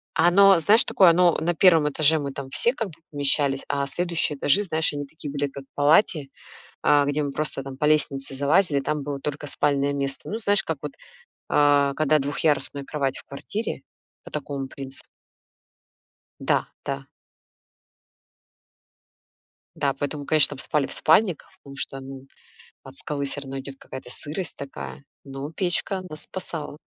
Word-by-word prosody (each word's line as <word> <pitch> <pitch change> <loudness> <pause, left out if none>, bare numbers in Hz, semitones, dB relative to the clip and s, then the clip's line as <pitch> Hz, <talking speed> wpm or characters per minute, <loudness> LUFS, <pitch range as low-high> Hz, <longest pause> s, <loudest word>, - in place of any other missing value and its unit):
Оно, 190 +3 +6
знаешь, 215 +8 +5
такое. 185 -3 +5
Оно 175 0 +4
на 175 +2 0
1 165 -4 +5
этаже- 155 +2 +3
мы 140 -1 -4
там 135 -1 -7
все 235 - +2
как 225 -5 -3
бы - - -14 0.2
помещались, 140 -1 +2
а 140 -1 0
следующие 170 -1 -1
этажи, 145 +9 +3
знаешь, 160 -4 0
они 145 0 -4
такие 145 0 -8
были, 145 0 -1
как 140 0 -9
в - - -54
палате, 150 +1 +3 0.6
а, 145 -1 +5
где 145 +1 0
мы 140 - -2
просто 150 -2 -3
там 135 -1 -8
по 150 - 0
лестнице 140 -3 +1
залазили- 145 +2 +3
там 150 +1 -2
было 145 -1 -4
только 145 +1 -5
спальное 140 0 +1
место. 140 -1 -4
Ну, 215 - -2
знаешь, 205 -3 +2
как 160 - -3
вот, 150 - -5 0.6
э, 145 -1 +4
когда 155 0 +3
двухъярусная 145 0 -1
кровать 140 -2 -2
в - - -11
квартире, 200 +10 -5 0.4
по - - -12
такому 140 -2 -4
принци 135 0 -7 1.4
Да-да. 135 0 -2 2.7
Да, 140 -1 +1
поэтому, 145 +1 -4
конечно, 155 -2 +5
чтоб 145 -2 -6
спали 145 -3 0
в - - -6
спальниках, 175 +1 +2
потому 140 -1 -12
что, 135 -1 -4
ну, 135 0 -9 0.6
от - - -12
скалы 140 -1 -4
всё 140 +1 -4
равно 135 0 -6
идёт 135 0 -9
какая-то 130 -1 -9
сырость 150 +6 -5
такая, 70 - -8 0.2
но 135 +1 -6
печка 185 +2 0
нас 155 0 -7
спасала. 160 -5 -6
145 Hz, 160 wpm, -24 LUFS, 140-160 Hz, 2.7 s, Оно